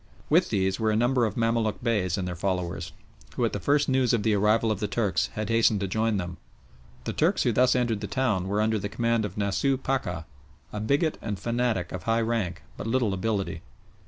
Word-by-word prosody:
With - - +4
these 95 -1 0
were 110 -1 +1
a 105 - +2
number 120 +1 +2
of 105 - -6
Mamaluk 115 0 0
Beys 100 -6 +1
and 95 -2 -2
their 90 - -4
followers, 90 -2 -2 0.4
who - - +1
at - - -1
the - - -2
first 145 +1 +2
news 130 -2 +2
of 115 -3 +1
the 110 - +2
arrival 105 +2 +3
of 105 - -2
the 105 - -1
Turks 100 -1 0
had 110 0 -3
hastened 115 -2 +3
to 100 - -1
join 110 +2 0
them. 90 -1 -4 0.7
The - - -3
Turks - - +2
who - - +2
thus 125 +1 +3
entered 120 -4 0
the 105 - -3
town 100 -4 0
were 100 +2 0
under 110 0 +1
the 100 +1 -4
command 115 0 0
of 100 -1 -7
Nasooh 105 +7 +1
Pacha, 110 -11 -2 0.5
a 105 - -3
bigot 140 +9 +1
and 105 -3 -3
fanatic 120 -5 -1
of 90 - -5
high 115 +1 +2
rank 110 - -2
but - - -5
little 115 -3 +1
ability. 100 -3 -2
110 Hz, 215 wpm, -27 LUFS, 95-115 Hz, 0.7 s, With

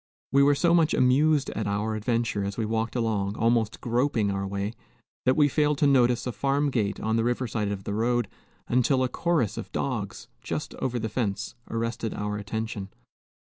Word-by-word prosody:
We 140 - +5
were 145 +1 +5
so 170 +4 +3
much 165 -2 +4
amused 140 +3 +3
at 110 - -3
our 105 +2 -1
adventure, 115 -1 -1
as 100 0 -4
we 115 - 0
walked 110 +1 -1
along, 105 -4 0
almost 115 -1 +1
groping 120 -3 +1
our 100 0 -2
way, 100 +2 -3 0.5
that 130 - +4
we 150 -1 +6
failed 150 +1 +1
to 145 - +2
notice 125 -4 +3
a 125 - -1
farm 140 +3 0
gate 105 -5 -1
on 110 +1 0
the 115 - +2
river 120 +1 0
side 105 -2 -2
of 100 -1 -4
the 100 - -3
road, 120 +2 +1 0.4
until 125 +2 +2
a - - +2
chorus 155 - 0
of - - -8
dogs, 110 -7 -3
just - - -4
over 125 -1 -1
the 110 -1 -2
fence, 105 -3 -2 0.2
arrested 115 -1 -2
our 105 0 -2
attention. 105 -1 -4
115 Hz, 190 wpm, -26 LUFS, 105-130 Hz, 0.5 s, we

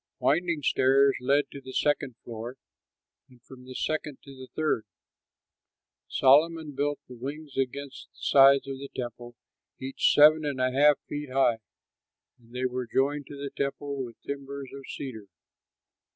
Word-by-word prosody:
Winding 165 0 +1
stairs 135 +1 +4
led 140 +2 +2
to 140 - -9
the 130 0 -10
second 145 -4 0
floor, 120 +2 -7 0.7
and 125 -1 -20
from 125 -1 -14
the 130 0 -10
second 150 -2 -2
to 140 - -12
the 130 0 -10
third. 155 -9 0 1.2
Solomon 155 +3 +4
built 145 +1 -1
the 125 - -11
wings 140 +4 -7
against 135 +1 -4
the - - -31
sides 135 -1 +5
of 135 -1 -5
the 140 0 -8
temple, 120 -1 -6 0.4
each 135 +1 +1
seven 155 +1 +7
and 145 -3 -2
a 130 0 +2
half 145 +2 +5
feet 145 -1 -5
high; 130 -4 +3 0.8
and 115 -1 -22
they 125 +1 -2
were 125 -1 -2
joined 140 +3 0
to 145 - -9
the 140 0 -5
temple 140 0 -3
with 115 -3 -10
timbers 140 -1 -6
of 135 -1 -9
cedar. 110 -7 -7
135 Hz, 155 wpm, -27 LUFS, 130-145 Hz, 1.2 s, seven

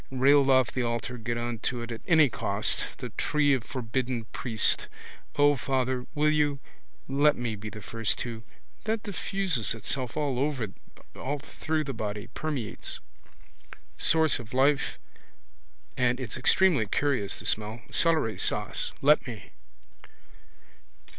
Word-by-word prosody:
Railed 135 +1 +4
off 130 -3 +4
the 130 - -1
altar 120 +1 -2
get 120 +1 -2
on 120 -1 -3
to 120 +1 -2
it 115 - -7
at 115 - -6
any 160 -3 +6
cost. 115 - -1
The - - -6
tree 145 -1 +2
of 130 -4 0
forbidden 125 -1 -3
priest. 115 -4 +2 0.5
O, 145 0 +5
father, 130 -1 -1
will 150 +1 +3
you? 150 -2 +1 0.5
Let 145 +2 +4
me 120 -2 -3
be 105 +1 -7
the 110 -1 -10
first 115 0 -2
to. 115 -2 -6 0.4
That 220 0 -1
diffuses 190 - -1
itself 125 +3 -3
all 145 0 0 0.9
through 155 +1 -2
the 135 -2 -4
body, 105 -1 -4
permeates. 140 -9 -4 1.0
Source 160 -3 +3
of 120 +1 -9
life. 135 +2 +2 1.0
And 125 0 +1
it's 125 -5 -4
extremely 135 - +4
curious 125 -4 0
the - - -11
smell. 110 +2 -2
Celery 155 - +3
sauce. - - +1
Let 145 0 +5
me. 110 -5 -8
130 Hz, 135 wpm, -28 LUFS, 115-145 Hz, 1.0 s, any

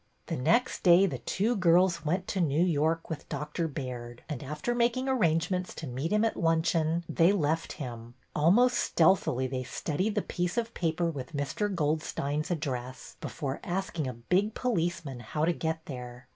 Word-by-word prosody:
The - - -3
next 225 - +2
day 180 +1 +7
the 135 -10 -2
two 215 - 0
girls 175 -2 +4
went 180 +4 -1
to 190 - 0
New 160 +1 +3
York 165 0 +1
with 160 -3 -6
Dr. 150 +3 -2
Baird, 125 -5 -6
and, 145 -5 -4
after 150 - -3
making 240 +2 +1
arrangements 180 -6 +1
to 160 - -6
meet 135 +5 -3
him 210 +1 +3
at 225 - 0
luncheon, 165 0 +2
they 170 +2 +4
left 165 -4 0
him. 120 -4 -7 0.2
Almost 205 +12 +5
stealthily 160 -6 +3
they 130 0 -2
studied 165 - -2
the 210 - +1
piece 180 +4 -2
of 230 0 -1
paper 170 0 0
with 135 -1 -7
Mr. 145 +9 -1
Goldstein's 150 -3 -1
address 130 -6 -4
before 140 -3 -4
asking 175 -5 -2
a 130 - -3
big 180 - 0
police 175 -9 -1
man 135 -3 -6
how 150 +7 -1
to 175 - +2
get 160 -1 -3
there. 125 -2 -8
160 Hz, 170 wpm, -29 LUFS, 140-185 Hz, 0.2 s, day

